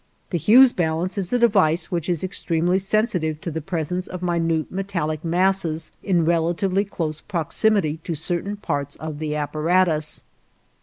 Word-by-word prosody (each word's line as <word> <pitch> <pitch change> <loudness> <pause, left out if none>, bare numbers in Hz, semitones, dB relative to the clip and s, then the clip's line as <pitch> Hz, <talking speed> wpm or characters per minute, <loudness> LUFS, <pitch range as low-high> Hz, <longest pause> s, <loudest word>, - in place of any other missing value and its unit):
The 175 - 0
Hughes 240 - +7
balance 170 +2 -1
is 185 -2 -2
a 245 - +3
device 185 -8 +2
which 175 -1 -2
is 175 -2 -1
extremely 180 -1 0
sensitive 190 -6 0
to 170 - -4
the 160 +1 -4
presence 180 +2 -3
of 180 0 -7
minute 165 -2 0
metallic 170 -6 -3
masses 170 -2 0
in 175 -5 +1
relatively 170 +4 +1
close 155 -6 -4
proximity 175 -1 0
to 170 - -2
certain 175 +6 -2
parts 145 -7 -3
of 155 -2 -7
the 155 -1 -2
apparatus. 155 +2 +1
170 Hz, 150 wpm, -22 LUFS, 160-190 Hz, -, Hughes